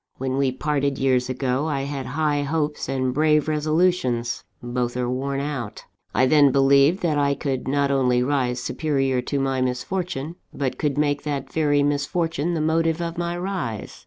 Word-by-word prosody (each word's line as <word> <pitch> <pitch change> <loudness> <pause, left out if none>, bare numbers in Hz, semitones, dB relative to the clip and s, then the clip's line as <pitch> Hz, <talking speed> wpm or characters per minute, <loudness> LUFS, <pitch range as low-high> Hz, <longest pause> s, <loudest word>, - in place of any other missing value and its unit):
When 130 0 -2
we 135 -1 +2
parted 140 0 -1
years 130 -1 +1
ago, 130 +3 -1
I 140 -3 -1
had 140 -1 -4
high 145 +2 0
hopes 150 -1 -2
and 130 -1 0
brave 150 +1 +3
resolutions 155 -6 +1 0.2
both 120 0 -2
are 125 -1 -1
worn 135 +2 -2
out. 140 -6 -5 0.3
I 130 - +3
then 145 0 +5
believed 140 +7 +4
that 155 -4 +1
I 140 -1 +2
could 135 -3 -3
not 140 +1 +1
only 125 -2 +2
rise 125 -2 0
superior 135 -1 0
to 140 +3 -2
my 135 -1 0
misfortune, 155 +4 -3
but 135 -3 -3
could 145 -2 0
make 145 -1 +1
that 140 -3 -4
very 145 -2 +2
misfortune 160 +3 0
the 160 - -1
motive 160 +1 +1
of 170 0 -4
my 175 0 -2
rise. 175 - -4
140 Hz, 170 wpm, -23 LUFS, 130-155 Hz, 0.3 s, then